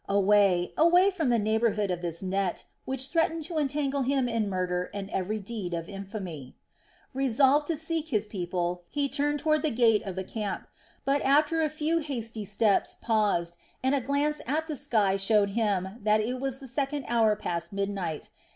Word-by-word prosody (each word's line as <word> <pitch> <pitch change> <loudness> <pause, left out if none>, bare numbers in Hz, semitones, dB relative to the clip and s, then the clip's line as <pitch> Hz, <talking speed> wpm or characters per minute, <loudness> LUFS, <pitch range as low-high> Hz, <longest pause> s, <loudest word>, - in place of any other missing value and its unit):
Away, 200 -3 +3
away 355 +4 +5
from 325 -8 -1
the 240 - +3
neighborhood 215 -2 +1
of 175 -1 -3
this 170 0 -4
net, 190 -1 -1 0.2
which 265 0 -1
threatened 330 -1 +1
to 325 0 -2
entangle 280 -1 0
him 265 -1 +1
in 230 -3 0
murder 180 -1 -1
and 200 -1 -5
every 200 +3 -2
deed 200 -4 -4
of 165 0 -5
infamy. 195 - -7 0.6
Resolved 270 +3 +3
to 330 - 0
seek 320 +1 -2
his 215 -8 0
people, 180 -3 -3
he 285 -1 0
turned 290 +1 0
toward 310 0 +1
the 310 - +1
gate 225 -4 +3
of 195 -4 -6
the 190 - -3
camp, 210 +1 -4 0.4
but 280 +1 +2
after 300 +4 +3
a 310 - +1
few 310 +2 0
hasty 230 -8 -4
steps 205 0 +1
paused, 200 -7 +1 0.3
and 265 +1 +2
a 280 - +2
glance 285 +4 0
at 310 +4 0
the 310 - -3
sky 205 -6 +1
showed 200 0 +3
him 200 -4 0
that 215 +1 +3
it 245 +4 -2
was 270 -1 -2
the 270 -1 -10
second 275 +2 -2
hour 225 -2 +3
past 170 -5 -3
midnight. 195 -5 -3
225 Hz, 180 wpm, -28 LUFS, 195-285 Hz, 0.6 s, away